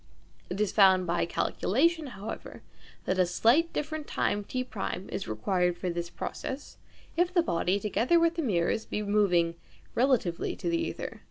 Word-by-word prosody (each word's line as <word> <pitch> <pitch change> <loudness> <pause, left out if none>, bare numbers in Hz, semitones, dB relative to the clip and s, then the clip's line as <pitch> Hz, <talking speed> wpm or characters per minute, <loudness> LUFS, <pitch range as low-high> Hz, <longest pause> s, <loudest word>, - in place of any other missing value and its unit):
It 185 - -4
is 210 -2 +1
found 190 -3 +5
by 170 0 0
calculation, 310 - +1
however, 215 -4 -8 0.4
that 185 0 0
a 185 - +5
slightly 245 - +3
different 310 0 -3
time 205 0 0
T1 215 -5 -4
is 195 - -4
required 180 - 0
for 180 - -2
this 170 0 -4
process, 265 +9 -6 0.4
if 350 +1 +2
the 350 -2 +3
body, 180 - +1
together 230 - +2
with 335 0 +3
the 335 - -2
mirrors, 210 - +1
be 210 - -3
moving 195 -5 +2 0.4
relatively 235 -10 +1
to - - -3
the 335 0 0
ćther. - - -6
205 Hz, 160 wpm, -29 LUFS, 180-295 Hz, 0.4 s, found